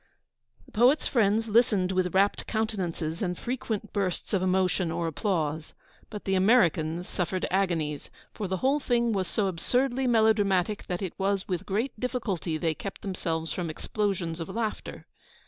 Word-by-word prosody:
The - - -19
poet's 250 +7 +4
friends 225 -2 +2
listened 210 -4 +3
with 185 -1 0
rapt 200 +1 +2
countenances 185 -7 -2
and 180 -3 -1
frequent 225 -4 -4
bursts 190 -2 -2
of 195 - +2
emotion 185 -2 +1
or 170 +1 -1
applause; 160 -2 -2 0.3
but 210 -2 -7
the 195 - 0
Americans 180 -5 +3
suffered 185 0 -2
agonies, 165 -6 0 0.2
for 210 - -4
the 190 +1 -1
whole 280 +3 +3
thing 235 -4 +1
was 190 -3 0
so 205 +4 0
absurdly 250 +9 0
melodramatic 210 -4 +2
that 180 +1 -3
it 185 - -3
was 195 0 0
with 180 -3 -3
great 220 +5 -1
difficulty 210 -10 -2
they 160 0 0
kept 195 +5 -7
themselves 165 -4 -2
from 175 -3 -3
explosions 175 -2 -2
of 165 - -5
laughter. 225 -2 -4
190 Hz, 155 wpm, -28 LUFS, 175-220 Hz, 0.3 s, poet's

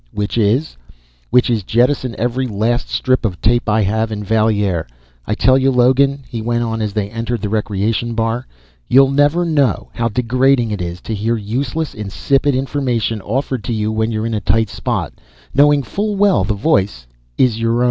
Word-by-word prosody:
"Which 105 0 -3
is?" 115 - +1 0.5
"Which 125 +1 +3
is 115 -3 0
jettison 120 +4 +1
every 125 +3 -1
last 115 +3 -1
strip 130 0 0
of 95 -6 -2
tape 120 +1 +1
I 110 +1 +2
have 110 +3 0
in 105 -1 -4
Valier. 105 - +1 0.4
I 105 - 0
tell 130 +3 +4
you, 135 +1 +3
Logan," 135 +2 +3
he 115 - -5
went 120 +1 -1
on 115 -1 -2
as 105 -2 -2
they 100 -1 -2
entered 115 0 -3
the 105 - -1
recreation 110 +2 -1
bar, 115 +2 -1 0.4
"you'll 135 +1 +5
never 145 +5 +2
know 145 - 0
how 115 0 -1
degrading 125 +1 +1
it 105 -3 -3
is 85 0 -5
to 115 - -5
hear 110 +3 -1
useless, 130 +9 -3
insipid 135 +7 0
information 125 -5 -1
offered 130 +2 -2
to 120 - -2
you 110 0 -1
when 110 +1 -1
you're 110 0 -2
in 115 - -2
a 105 - -1
tight 110 +2 +1
spot, - - -3 0.4
knowing 145 0 +4
full 205 - -2
well 200 - +3
the 105 +3 -1
voice 100 - 0 0.3
is 120 -4 +2
your 115 0 +1
own!" - - +1
115 Hz, 190 wpm, -17 LUFS, 105-130 Hz, 0.5 s, you'll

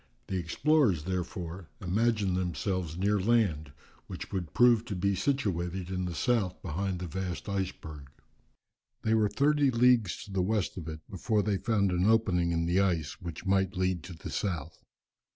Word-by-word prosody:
The 95 - -1
explorers, 100 - +2
therefore, 90 -1 -4
imagined 105 0 +1
themselves 90 -1 -2
near 100 +2 +2
land, 95 -9 +1 0.4
which - - -7
would 90 -5 -3
prove 120 -2 +5
to 100 - -4
be 100 +2 +1
situated 95 -7 -1
in 90 -1 -2
the 85 -1 -4
south 105 -4 0
behind 95 +4 -2
the 90 - -5
vast 90 0 -4
iceberg. 85 -8 -4 0.9
They 110 - +2
were 110 -2 +3
thirty 145 +6 +3
leagues 120 -6 +3
to 100 - -12
the 95 -1 0
west 105 +1 0
of 85 -4 -7
it, 80 -1 -6
before 105 +1 0
they 105 -1 +1
found 100 -3 +1
an 90 +1 +1
opening 95 -6 +3
in 85 0 0
the 90 +2 +2
ice 85 -6 0
which 85 0 -7
might 95 -1 +1
lead 90 -2 0
to 90 - -8
the 80 - -8
south. 85 -6 -3
95 Hz, 170 wpm, -30 LUFS, 85-105 Hz, 0.9 s, prove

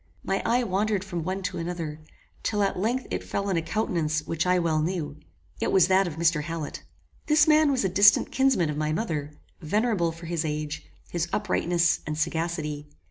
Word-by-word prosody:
My 195 - -1
eye 245 +2 +2
wandered 205 -1 0
from 175 -4 -4
one 190 +3 -3
to - - -3
another, 165 -3 -4 0.4
till 210 -2 0
at 195 - 0
length 240 +6 0
it - - -2
fell 200 0 -3
on 190 - +1
a 165 - +1
countenance 160 -5 -1
which 165 +3 -1
I 180 0 +4
well 165 -3 +1
knew. 155 -3 -2 0.4
It - - 0
was 185 -2 +5
that 190 0 +4
of 160 - -5
Mr. 165 -2 +2
Hallet. 165 -1 -5 0.5
This 300 0 +5
man 310 -1 +5
was 260 -7 +1
a - - +4
distant 200 +2 +5
kinsman 260 - +2
of 150 - -5
my 155 0 0
mother, 150 -6 -3 0.2
venerable 200 0 +1
for 165 +1 -11
his 165 -1 -2
age, 150 0 -4 0.2
his 170 -1 -1
uprightness, 175 -4 +1
and 150 0 -3
sagacity. 160 -2 -2
170 Hz, 190 wpm, -26 LUFS, 155-200 Hz, 0.5 s, was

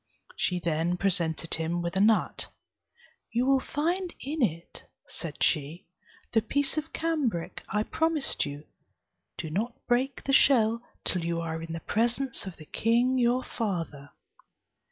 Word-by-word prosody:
She 180 -1 0
then 170 +1 0
presented 170 -4 0
him 165 +2 -1
with 170 +1 -3
a - - +2
nut: 215 +2 +3 0.8
"You 240 +2 +2
will 270 0 +5
find 345 +7 -1
in 295 +3 -3
it," 170 -7 -1 0.2
said 155 -4 -5
she, 155 +4 +1 0.5
"the 225 - +4
piece 280 +5 0
of 310 0 -3
cambric 290 - -1
I 210 +1 +1
promised 320 +2 +1
you. 145 0 -6 0.7
Do 160 - -5
not 225 +8 -1
break 255 +3 +1
the 275 - 0
shell 230 -4 +5 0.2
till 180 -2 +1
you 170 0 -1
are 160 -1 -3
in 165 0 -6
the 165 - -4
presence 235 +1 0
of 185 - -7
the 155 - -11
king 240 - +2
your 245 +1 +3
father." 165 - -3
215 Hz, 150 wpm, -28 LUFS, 165-260 Hz, 0.8 s, will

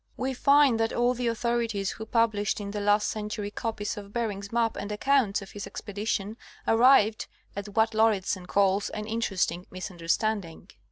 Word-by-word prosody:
We 265 +1 -1
find 280 -2 +4
that 225 0 0
all 240 +1 +2
the 245 -1 -2
authorities 230 -3 -1
who 220 - -8
published 215 -3 +1
in 200 -1 -5
the 210 - -3
last 205 +1 +3
cen 210 -1 -3
tury 205 -1 -4
copies 220 -2 -3
of 200 -1 -9
Bering's 205 -4 -3
map 230 -1 +1
and 205 - -5
accounts 210 -2 +1
of 195 - -12
his 205 - -7
expedition 210 0 -4 0.3
arrived 225 -2 +5 0.3
at 200 0 -7
what 220 0 +3
Lauridsen 205 -4 +1
calls 200 0 +2
an 210 0 -5
"interesting 195 -5 -1
misunderstanding." 185 +1 -3
215 Hz, 165 wpm, -27 LUFS, 200-230 Hz, 0.3 s, arrived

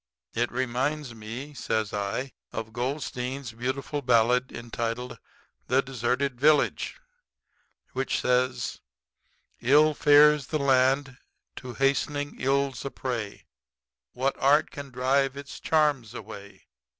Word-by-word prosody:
It 120 +1 0
reminds 130 +2 -1
me,' 115 +6 -7
says 110 -6 -2
I, 105 +6 -2 0.2
'of 110 0 -6
Goldstein's 130 0 -3
beautiful 130 +5 -3
ballad 125 0 +3
entitled 120 +1 -4 0.5
"The 130 +2 +3
Deserted 125 0 -1
Village," 150 0 +3 1.0
which 135 +1 -1
says: 125 -1 0 0.8
'Ill 150 +4 +5
fares 150 -1 +5
the 155 - -1
land, 135 -1 +2 0.4
to 125 -1 -7
hastening 145 +1 0
ills 135 +1 0
a 140 - -3
prey, 120 -7 -5 0.7
What 135 +2 0
art 145 +3 +4
can 140 -1 -8
drive 135 +2 +1
its 140 0 -8
charms 145 -8 +1
away? 100 -1 -10
130 Hz, 110 wpm, -27 LUFS, 120-140 Hz, 1.0 s, Ill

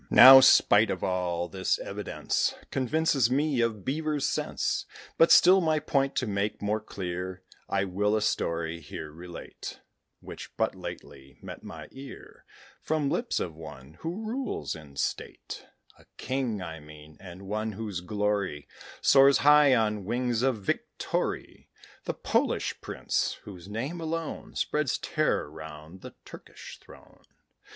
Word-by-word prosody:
Now, 135 +1 +11
spite 110 -4 +6
of 90 - -3
all, 90 -2 -1
this 95 +1 0
evidence - - -2 0.2
Convinces 135 -1 +2
me 140 -1 +1
of 110 -4 -1
beavers' 150 0 -1
sense. - - -1 0.3
But 165 - +5
still, 185 +1 +7
my 160 -2 +2
point 140 -2 0
to 130 - 0
make 105 0 -2
more 105 +1 -1
clear, 95 -2 -6 0.3
I 100 - +1
will 105 +3 0
a 110 - +1
story 85 -5 -1
here 75 0 -8
relate, 85 +2 -9 0.4
Which - - -10
but - - +1
lately 70 0 -10
met - - -9
my - - -9
ear 135 0 -12 0.4
From 150 -3 0
lips 235 - -1
of 85 - -3
one 75 -3 -11
who 180 +7 -5
rules 255 +3 -3
in 75 -3 -13
state: - - -4 0.3
A - - -20
king, 125 -7 -2
I 80 -2 -7
mean, 75 0 -14
and 95 0 -11
one 110 +2 -3
whose 100 -3 -5
glory 100 -5 -2 0.3
Soars 135 0 +6
high 150 -2 +6
on 105 -3 0
wings 120 +2 -1
of 125 -6 0
victory - - -3 0.4
The - - -2
Polish - - -1
prince, - - -1
whose 95 -3 -11
name 135 +11 -4
alone 165 0 -4
Spreads 150 -4 0
terror - - 0
round 80 +3 -10
the - - -10
Turkish - - -11
throne. - - -17
105 Hz, 140 wpm, -28 LUFS, 90-135 Hz, 0.4 s, Now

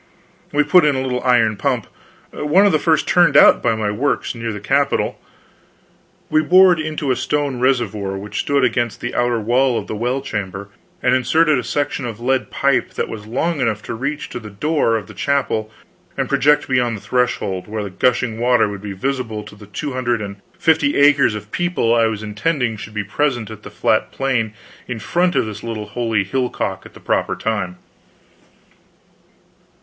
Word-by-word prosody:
We 150 0 +3
put 175 +4 +5
in 150 -2 +3
a 130 - -1
little 125 -1 -2
iron 115 -4 +3
pump, - - -1 0.5
one 165 +7 +3
of 200 - +4
the 155 - +2
first 160 -1 +2
turned 175 -5 +4
out - - +7
by 115 - +1
my 105 -1 -1
works 135 +7 -1
near 115 -1 -4
the 105 - -6
capital; 140 +7 0 1.1
we 155 - +3
bored 180 +2 +6
into 155 -3 -2
a - - +2
stone 145 -3 -1
reservoir 110 -7 0
which 105 +2 -5
stood 140 -2 +1
against 120 -2 0
the 120 - -4
outer 120 -1 +1
wall 120 +3 +2
of - - -3
the - - -5
well 120 +5 -1
chamber 100 -5 -5 0.3
and 125 - +3
inserted 145 +4 +3
a - - -4
section 145 -3 -2
of 115 -2 -7
lead 130 +2 0
pipe 140 -1 0
that - - -2
was 105 -1 -8
long 145 +6 -1
enough 110 -4 -1
to - - -5
reach 140 +6 -3
to - - -6
the 110 -2 -10
door 130 +3 0
of 110 -4 -3
the - - -12
chapel 130 -6 -1 0.5
and - - -1
project 145 +1 +3
beyond 125 -3 +1
the - - -12
threshold, 100 -4 -1
where 105 0 -4
the 100 - -6
gushing 115 +1 0
water 120 -2 +3
would 100 -1 -6
be 100 -1 -6
visible 115 0 -3
to 105 - -12
the 105 -1 -14
two 140 +7 -5
hundred 120 -2 0
and 100 -1 -6 0.2
fifty 160 -3 +2
acres 140 -5 +5
of 105 0 -8
people 175 -10 0
I 115 -1 +4
was 110 -1 -4
intending 115 +3 -1
should 105 +1 -10
be 105 - -1
present 120 +1 -1
on 110 - -9
the - - -10
flat - - 0
plain 120 -5 -1 0.3
in 125 - -4
front 175 - 0
of - - +2
this 105 -1 -7
little 115 -2 -5
holy 115 -4 0
hillock 125 +5 -3 0.3
at - - -14
the - - -12
proper - - -1
time. 105 -5 -3
120 Hz, 195 wpm, -19 LUFS, 110-140 Hz, 1.1 s, out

